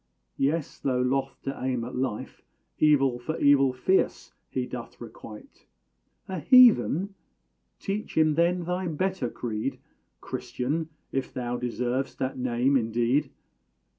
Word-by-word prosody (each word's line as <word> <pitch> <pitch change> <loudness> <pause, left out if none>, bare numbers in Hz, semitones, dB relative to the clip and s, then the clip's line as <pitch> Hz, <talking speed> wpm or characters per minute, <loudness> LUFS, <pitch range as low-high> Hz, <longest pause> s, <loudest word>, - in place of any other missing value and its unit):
Yes; 145 +2 -1
though 130 -2 0
loth 135 0 -1
to 135 - -3
aim 125 -2 -1
at 125 - -6
life, 125 -4 -3 0.4
Evil 135 -5 +4
for 155 +6 -4
evil 140 -2 +5
fierce 130 +10 0 0.2
he 130 -1 -2
doth 125 -1 -8
requite. 110 -2 -12 0.6
A 190 -2 -4
heathen? 205 - +5 0.7
Teach 205 -1 -4
him, 155 -1 +4
then, 170 +3 +2
thy 180 +2 -2
better 170 -4 -1
creed, 120 +3 -4 0.4
Christian! 155 +6 -3 0.2
if 135 -1 -2
thou 120 -1 -3
deserv'st 125 +2 -2
that 130 0 -2
name 125 +2 +1
indeed. 120 +4 +1
135 Hz, 125 wpm, -27 LUFS, 125-160 Hz, 0.7 s, evil